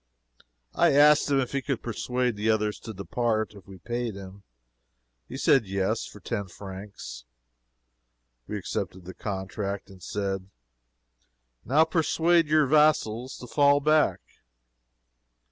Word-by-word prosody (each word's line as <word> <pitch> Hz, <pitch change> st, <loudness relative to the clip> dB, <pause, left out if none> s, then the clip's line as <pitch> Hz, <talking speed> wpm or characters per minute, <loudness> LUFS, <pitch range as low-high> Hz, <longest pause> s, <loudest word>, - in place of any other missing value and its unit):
I 170 Hz, -4 st, +4 dB
asked 150 Hz, +1 st, +6 dB
him 140 Hz, -1 st, +3 dB
if 130 Hz, -, -1 dB
he 140 Hz, -, -1 dB
could 135 Hz, -3 st, -3 dB
persuade 125 Hz, +1 st, -1 dB
the 105 Hz, +2 st, -1 dB
others 105 Hz, -1 st, +1 dB
to 110 Hz, -, -8 dB
depart 110 Hz, +2 st, -1 dB
if 100 Hz, -2 st, -15 dB
we 95 Hz, -1 st, -11 dB
paid 120 Hz, +3 st, -4 dB
him. 100 Hz, 0 st, -10 dB, 0.9 s
He -, -, -6 dB
said 125 Hz, -7 st, +3 dB
yes 95 Hz, +3 st, -1 dB
for 105 Hz, -, -12 dB
ten 100 Hz, 0 st, -4 dB
francs. 95 Hz, -10 st, -9 dB, 1.2 s
We 105 Hz, -, -3 dB
accepted 95 Hz, -2 st, -4 dB
the 95 Hz, -, -8 dB
contract, 100 Hz, 0 st, -5 dB
and 95 Hz, -1 st, -15 dB
said 95 Hz, +1 st, -3 dB, 1.1 s
"Now 145 Hz, +6 st, +4 dB
persuade 165 Hz, 0 st, +2 dB
your 155 Hz, 0 st, +4 dB
vassals 135 Hz, -5 st, +2 dB
to -, -, -9 dB
fall 145 Hz, +3 st, +4 dB
back." 155 Hz, +1 st, +2 dB
110 Hz, 130 wpm, -27 LUFS, 100-140 Hz, 1.2 s, asked